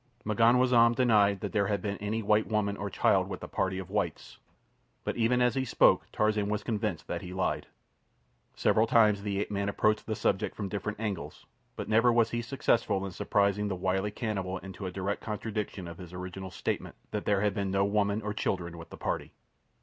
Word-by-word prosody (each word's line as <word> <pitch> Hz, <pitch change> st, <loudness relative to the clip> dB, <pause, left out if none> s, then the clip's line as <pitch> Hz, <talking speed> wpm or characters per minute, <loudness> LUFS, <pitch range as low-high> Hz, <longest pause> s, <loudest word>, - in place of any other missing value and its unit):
M'ganwazam 120 Hz, +2 st, +4 dB
denied 105 Hz, -6 st, +3 dB
that -, -, -3 dB
there 100 Hz, -2 st, +1 dB
had 100 Hz, -1 st, 0 dB
been 100 Hz, 0 st, -4 dB
any 110 Hz, +2 st, -2 dB
white 105 Hz, +1 st, +3 dB
woman 105 Hz, -2 st, 0 dB
or 100 Hz, 0 st, -4 dB
child -, -, +2 dB
with -, -, -5 dB
the -, -, -7 dB
party 95 Hz, 0 st, -1 dB
of 95 Hz, -2 st, -7 dB
whites; -, -, -3 dB, 0.6 s
but -, -, -2 dB
even 125 Hz, +2 st, +2 dB
as 125 Hz, -2 st, +3 dB
he 130 Hz, -, 0 dB
spoke 130 Hz, -, +4 dB
Tarzan 105 Hz, -1 st, +1 dB
was 105 Hz, 0 st, -1 dB
convinced 105 Hz, -9 st, -2 dB
that 85 Hz, -, -4 dB
he 90 Hz, 0 st, -7 dB
lied. 95 Hz, -, -1 dB, 0.9 s
Several 110 Hz, +1 st, +3 dB
times 105 Hz, -3 st, +4 dB
the 100 Hz, -1 st, -2 dB
ape 105 Hz, -, -3 dB
man 100 Hz, 0 st, -1 dB
approached 105 Hz, +1 st, +1 dB
the 110 Hz, -, -1 dB
subject 95 Hz, -1 st, 0 dB
from 100 Hz, -2 st, -4 dB
different 105 Hz, +1 st, -4 dB
angles, 105 Hz, -5 st, -4 dB, 0.3 s
but -, -, -5 dB
never 115 Hz, +3 st, +4 dB
was 115 Hz, -1 st, +3 dB
he 120 Hz, -, -1 dB
successful 115 Hz, -5 st, 0 dB
in 95 Hz, -, -5 dB
surprising 100 Hz, +2 st, +1 dB
the 100 Hz, -, -2 dB
wily 95 Hz, +2 st, 0 dB
cannibal 100 Hz, -4 st, -3 dB
into 95 Hz, +1 st, -7 dB
a -, -, -4 dB
direct 95 Hz, +2 st, -3 dB
contradiction 105 Hz, -3 st, -4 dB
of 85 Hz, 0 st, -9 dB
his 90 Hz, -1 st, -10 dB
original 90 Hz, +1 st, -6 dB
statement 85 Hz, -, -3 dB, 0.2 s
that 105 Hz, -, -3 dB
there 100 Hz, -2 st, +2 dB
had 105 Hz, -1 st, +1 dB
been 100 Hz, -2 st, -2 dB
no 100 Hz, +1 st, +2 dB
women 100 Hz, +1 st, +1 dB
or 105 Hz, 0 st, -2 dB
children 85 Hz, -4 st, -2 dB
with 80 Hz, -, -10 dB
the -, -, -10 dB
party. -, -, -3 dB
105 Hz, 205 wpm, -29 LUFS, 95-110 Hz, 0.9 s, M'ganwazam